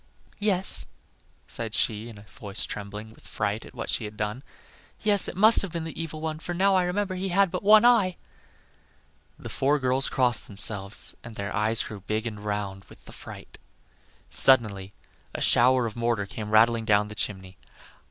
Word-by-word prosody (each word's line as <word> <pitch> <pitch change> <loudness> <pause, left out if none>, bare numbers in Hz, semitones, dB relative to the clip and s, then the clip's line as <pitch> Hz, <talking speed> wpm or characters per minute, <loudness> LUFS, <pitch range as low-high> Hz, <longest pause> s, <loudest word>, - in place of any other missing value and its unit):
"Yes," 195 -3 +2 0.6
said 115 -1 -5
she, 110 +1 -1
in 110 - -12
a 100 - -13
voice 105 -1 -4
trembling 105 +1 -8
with - - -17
fright 105 +1 -3
at - - -16
what - - -5
she 110 - -2
had 105 0 -9
done, 105 +4 -3 0.6
"yes, 205 -3 +3
it - - -7
must 220 +3 +6
have 195 - -5
been 170 -1 -4
the 160 0 -6
evil 155 -1 -6
one, 155 -1 -4
for 175 +2 -5
now 195 +2 +3
I 185 -1 +2
remember 190 +2 -2
he 185 +1 -3
had 195 0 +2
but 180 - -3
one 215 +3 +6
eye." 215 -7 +4 1.2
The - - -9
four 140 +2 +1
girls 130 0 0
crossed 125 -3 +1
themselves, 100 0 0
and 115 -2 -10
their 100 0 -5
eyes 110 +2 +1
grew 105 -3 -8
big 110 +3 -3
and 105 -3 -6
round 100 -2 -4
with - - -18
the - - -12
fright. - - -12 0.7
Suddenly 105 -7 +4 0.4
a - - -3
shower 125 +1 +4
of 110 - -5
mortar 115 -3 -1
came 105 +2 -7
rattling 115 +1 +3
down 105 -1 +2
the 105 - -9
chimney. 95 -3 -4
115 Hz, 185 wpm, -26 LUFS, 105-170 Hz, 1.2 s, must